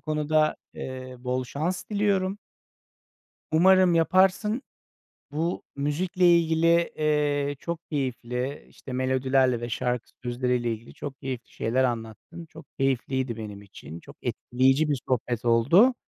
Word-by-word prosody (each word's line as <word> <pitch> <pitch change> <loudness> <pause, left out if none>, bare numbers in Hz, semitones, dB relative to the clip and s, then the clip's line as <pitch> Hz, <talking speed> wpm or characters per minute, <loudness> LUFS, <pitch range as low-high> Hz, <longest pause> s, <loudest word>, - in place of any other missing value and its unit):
konuda, 155 0 +1 0.2
eee, 130 0 -7
bol 125 +1 -2
şans 160 +8 -3
diliyorum. 200 -2 +1 1.1
Umarım 185 +2 +5
yaparsın. 190 +7 +3 0.7
Bu 160 +4 -2
müzikle 175 +5 +3
ilgili, 165 0 +1 0.3
eee, 145 -2 +1
çok 170 +2 -5
keyifli, 130 -1 -3
işte, 130 - -11
melodilerle 130 -1 +2
ve 120 - -4
şarkı 125 0 -2
sözleriyle 120 -1 0
ilgili 115 +1 -9
çok 140 -2 -7
keyifli 130 -3 -5
şeyler 125 +4 0
anlattın. 120 +8 -4
Çok 160 0 -14
keyifliydi 130 -2 0
benim 105 -2 -7
için. 85 -5 -11
Çok - - -14
etkileyici 135 +5 +1
bir 145 -3 +1
sohbet 120 -2 -1
oldu. 145 - +5
135 Hz, 120 wpm, -26 LUFS, 125-165 Hz, 1.1 s, Umarım